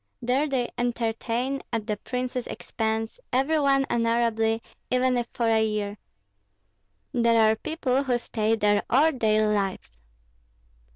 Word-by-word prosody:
There 255 +4 +1
they 260 -4 -1
entertain, 240 +2 -1
at 225 -3 -2
the 210 -1 -1
prince's 250 +3 -4
expense, 220 - -3
every 275 +5 +2
one 275 -1 +3
honorably, 230 -1 +1 0.3
even 255 0 +2
if 240 -1 -1
for 235 - -1
a 225 -1 +3
year; 210 -1 -2 1.1
there 235 -1 +3
are - - +1
people 270 -1 -1
who 250 -2 +2
stay 225 -2 0
there 205 -1 +2
all 295 +6 +4
their 215 -3 +2
lives." 195 - -3
235 Hz, 130 wpm, -26 LUFS, 220-255 Hz, 1.1 s, all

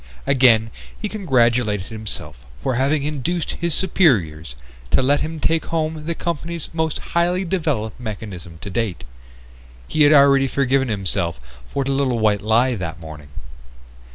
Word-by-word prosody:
Again 120 -5 +4 0.3
he 215 - -2
congratulated 120 - +1
himself 110 - -6 0.2
for 130 - 0
having 140 +4 +1
induced 155 +4 -2
his 170 -3 -2
superiors 90 - +1 0.3
to - - +3
let 145 +2 +3
him 160 0 -4
take 160 +2 0
home 155 -1 -2
the 170 - -1
company's 170 0 -4
most 160 -1 -1 0.2
highly 175 +2 +1
developed 150 - -2
mechanism 100 -7 -7
to 100 - -7
date. 110 -4 -2 0.8
He 155 - -1
had 145 0 +7
already 140 -2 +6
forgiven 135 0 +1
himself 95 - -2 0.3
for 140 - -1
the 135 - -2
little 135 -3 +1
white 105 -2 +2
lie 115 +4 +3
that 90 -6 -5
morning. 75 -3 -10
130 Hz, 145 wpm, -21 LUFS, 105-155 Hz, 0.8 s, had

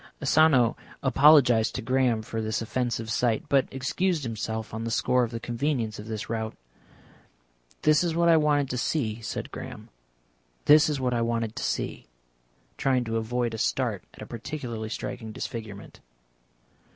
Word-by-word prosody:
Asano 140 -5 +4 0.3
apologised 135 -6 +5
to - - -2
Graham 125 -2 +1
for 110 +1 -4
this 110 0 -1
offensive 115 0 -2
sight, 115 -2 +1
but 140 -1 +3
excused 155 +5 -1
himself 110 -2 -4
on 110 +1 -4
the 115 - -2
score 125 +2 +2
of 120 - -1
the 115 0 -5
convenience 120 -2 -2
of 105 - -8
this 110 -2 -4
route. 110 -1 -3 1.3
"This 155 +2 +4
is 170 -2 -1
what 170 0 +3
I 165 - +7
wanted 150 -2 +3
to 125 - -2
see," 115 -7 -1
said 110 - -5
Graham; - - -8 0.8
"this 150 +1 +7
is 145 -2 -1
what 125 -1 0
I 120 - +1
wanted 115 -1 -1
to - - -4
see," - - -3 0.7
trying 130 -2 +1
to 115 -1 -2
avoid 120 +1 -1
a 110 - -5
start - - 0
at - - -9
a - - -7
particularly 115 -2 -5
striking 110 0 -5
disfigurement. 110 -4 -7
120 Hz, 165 wpm, -27 LUFS, 110-140 Hz, 1.3 s, I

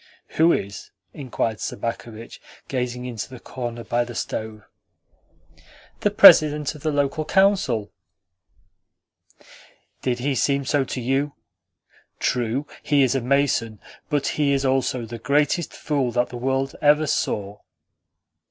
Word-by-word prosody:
"Who 165 +2 +3
is?" 100 -7 -3 0.2
inquired 115 -5 -3
Sobakevitch, 115 -1 -6 0.3
gazing 125 -1 -3
into 115 -4 -5
the 130 -2 -10
corner 120 -2 -6
by 120 +1 0
the 120 -1 -9
stove. 110 -1 -5 1.4
"The - - +2
President 150 -1 +7
of 150 - -13
the 155 - -1
Local 145 +2 0
Council." 170 - +2 2.1
"Did 125 -2 -1
he 135 +3 -1
seem 140 +2 0
so 140 +1 +1
to 130 - -5
you? 135 +4 -1 0.8
True, 125 +3 -1 0.2
he 145 -2 +3
is 130 - +2
a 135 - 0
mason, 125 -4 0 0.3
but 145 -2 0
he 145 -2 +1
is 135 0 0
also 130 -2 0
the 115 +1 -8
greatest 145 +7 +1
fool 140 -5 -2
that 120 0 +1
the - - -9
world 135 +2 -1
ever 150 +1 +4
saw." 105 -7 -2
130 Hz, 130 wpm, -23 LUFS, 120-145 Hz, 2.1 s, President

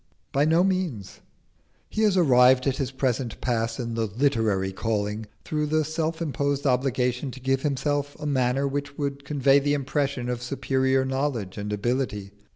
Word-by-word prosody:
By 140 +2 +2
no 165 +3 +4
means. 180 - -2 0.7
He 215 - -3
has 210 -3 +3
arrived 130 -5 +5
at 135 -2 +1
his 135 -3 -1
present 130 -2 -2
pass 115 -1 -1
in 115 -2 -3
"the 115 -1 -1
literary 110 -5 +1
calling" 105 +1 -2 0.2
through 150 -1 -1
the 155 0 +1
self 160 +1 -2
imposed 140 -1 -1
obligation 125 0 +1
to 130 - -9
give 135 +1 0
himself 145 0 -1
a 150 - -6
manner 135 -1 +1
which 145 +1 -4
would 140 -1 -3
convey 140 -1 +4
the 145 +1 +1
impression 140 -2 -1
of 125 -1 -2
superior 130 +1 +1
knowledge 130 -7 -2
and 105 +1 -4
ability. 105 -2 -2
135 Hz, 160 wpm, -25 LUFS, 120-145 Hz, 0.7 s, arrived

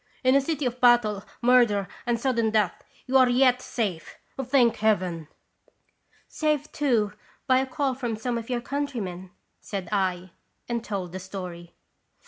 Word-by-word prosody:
" - - -33
In 255 0 +4
a 275 - +5
city 295 0 -2
of 250 0 -3
battle, 230 -5 +4 0.2
murder, 235 -6 +4 0.2
and 235 -1 +1
sudden 235 -3 +1
death, 210 -4 0 0.2
you 265 +1 +3
are 255 -1 +5
yet 250 0 +4
safe, 195 -11 -4 0.3
thank 250 -2 +3
Heaven! 185 -7 0 0.3
" - - -39
" - - -49 0.2
Saved, 300 -1 -1
too, 235 -8 +1 0.3
by 255 -2 +4
a 265 - -1
call 275 0 -1
from 245 -3 -3
some 235 +3 -3
of 230 0 -5
your 245 -1 -1
countrymen," 235 -11 -4 0.3
said 195 -4 -5
I, 185 -3 -1 0.4
and 235 -1 -2
told 190 -5 -4
the 190 - -6
story. 180 -2 -8
235 Hz, 165 wpm, -26 LUFS, 195-255 Hz, 0.4 s, a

